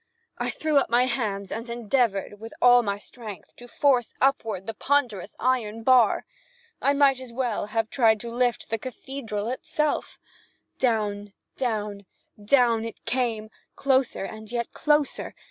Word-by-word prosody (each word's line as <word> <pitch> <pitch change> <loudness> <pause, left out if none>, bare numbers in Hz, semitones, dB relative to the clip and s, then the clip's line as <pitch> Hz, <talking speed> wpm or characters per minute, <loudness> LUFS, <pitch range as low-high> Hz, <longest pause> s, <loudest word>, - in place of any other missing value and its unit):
I - - -1
threw 310 -2 0
up - - -2
my 240 +2 +4
hands 210 -6 -2
and 230 +2 -5
endeavored, 230 -4 0
with 225 +1 -9
all 245 0 +7
my 200 -3 -2
strength, 210 -1 -10
to 245 - -11
force 250 -1 +1
upward 225 -8 +1
the 225 - -4
ponderous 230 -6 0
iron 225 -3 0
bar. 250 -3 +4 0.6
I 275 - +3
might 280 -2 +4
as 255 -2 -9
well 235 -4 -2
have 225 +1 -1
tried 225 -4 +4
to 235 - -6
lift 245 -2 0
the 225 - 0
cathedral 235 -4 -5
itself. 300 +4 -2 0.6
Down, 205 -4 0 0.2
down, 210 -5 -3 0.4
down 235 -1 +3
it 230 -1 -8
came, 225 -4 -1 0.2
closer 265 -6 +1
and 220 +1 -9
yet 235 -1 -2
closer. 295 -2 0
235 Hz, 145 wpm, -26 LUFS, 215-255 Hz, 0.6 s, all